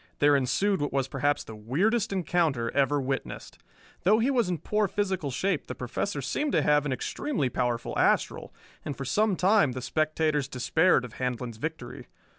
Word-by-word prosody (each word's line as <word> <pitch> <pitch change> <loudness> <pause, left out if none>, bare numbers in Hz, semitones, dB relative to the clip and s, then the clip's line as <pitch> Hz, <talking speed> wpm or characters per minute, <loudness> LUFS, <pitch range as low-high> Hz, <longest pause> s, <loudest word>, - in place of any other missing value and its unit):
There 145 0 +4
ensued 140 +8 +1
what 145 - -1
was 135 -1 0
perhaps 140 +2 0
the 110 - -10
weirdest 195 - 0
encounter 160 -10 0
ever 140 +1 +2
witnessed. 135 0 -4 0.4
Though 210 +4 +4
he 240 +5 +2
was 240 -8 +1
in 175 - -1
poor 210 +5 0
physical 190 -6 -2
shape, 185 +5 -1
the 125 - -5
Professor 140 +5 -3
seemed 290 - -1
to - - +3
have 150 0 +3
an - - -2
extremely 140 - -2
powerful 120 -1 -2
astral; - - +1 0.3
and 145 - -5
for 135 - -5
some 205 - +2
time 185 - +3
the 130 - -4
spectators 155 -2 0
despaired 135 +2 +2
of 120 - -11
Handlon's 125 -2 -3
victory. 150 -2 -6
145 Hz, 175 wpm, -27 LUFS, 130-190 Hz, 0.4 s, There